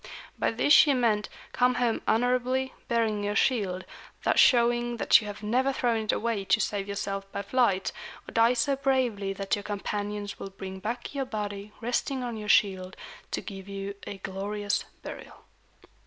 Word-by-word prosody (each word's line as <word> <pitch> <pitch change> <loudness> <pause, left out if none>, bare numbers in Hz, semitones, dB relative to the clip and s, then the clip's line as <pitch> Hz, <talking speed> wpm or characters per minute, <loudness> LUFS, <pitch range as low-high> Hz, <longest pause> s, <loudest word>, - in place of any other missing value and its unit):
By - - +1
this 250 +6 +3
she 290 -2 +7
meant 220 -4 +1 0.2
"Come 250 0 +2
home 240 -2 +1
honorably, 255 +3 +1
bearing 225 -3 +1
your 205 0 -1
shield, 200 -8 +1 0.4
thus - - +2
showing 240 -1 +4
that 230 - +5
you 210 - -7
have 205 +1 -7
never 255 +6 +2
thrown 235 -4 0
it - - +2
away 225 -3 -1
to 190 -1 +3
save 200 -1 -1
yourself 195 -1 -4
by 200 - -4
flight; 200 -4 +1 0.4
or - - -8
die 230 +1 +4
so 250 +3 +1
bravely 255 -8 0
that 195 0 -1
your 205 - -5
companions 205 0 -4
will 195 - -6
bring 190 0 -8
back 235 +7 -4
your 275 -1 -2
body 205 -3 -5
resting 250 +3 -1
on 240 -2 -3
your 210 -1 -6
shield, 190 -3 +2 0.3
to - - -2
give 195 -1 -9
you 195 0 -4
a 200 - -5
glorious 205 +2 -2 0.2
burial." - - -10
215 Hz, 170 wpm, -28 LUFS, 200-245 Hz, 0.4 s, she